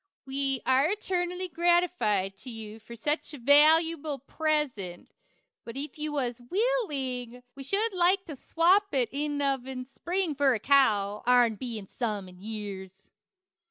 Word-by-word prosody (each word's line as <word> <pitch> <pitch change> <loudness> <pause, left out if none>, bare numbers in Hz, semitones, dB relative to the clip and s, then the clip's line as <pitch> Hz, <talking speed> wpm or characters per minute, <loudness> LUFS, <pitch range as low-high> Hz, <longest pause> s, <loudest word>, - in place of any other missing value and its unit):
We 270 -1 -1
air 265 +4 +3
etarnally 360 -2 -3
gratified 340 - +1
to 260 - -9
You 220 -2 -8
for 225 +2 -11
sech 295 +7 0
a - - -7
Valewble 305 +2 +4
Pressent, 280 - -2 0.5
but 230 +2 -8
if 290 +1 -6
you 305 0 -2
was 250 -4 -2
Wiling 275 - -2
we 275 - -10
shood 405 +9 0
Like 370 +2 +2
to 305 - -7
swapp 360 +7 +2
it 250 -3 +2 0.3
of 270 -2 0
in 255 -1 -5
spring 345 +5 -2
fur 275 -2 +3
a - - -3
kow, 210 -6 +3
ourn 245 -2 +5
Being 220 -2 -5
some 210 -2 -4
in 180 0 -15
years. 200 -3 -7
270 Hz, 145 wpm, -28 LUFS, 230-330 Hz, 0.5 s, ourn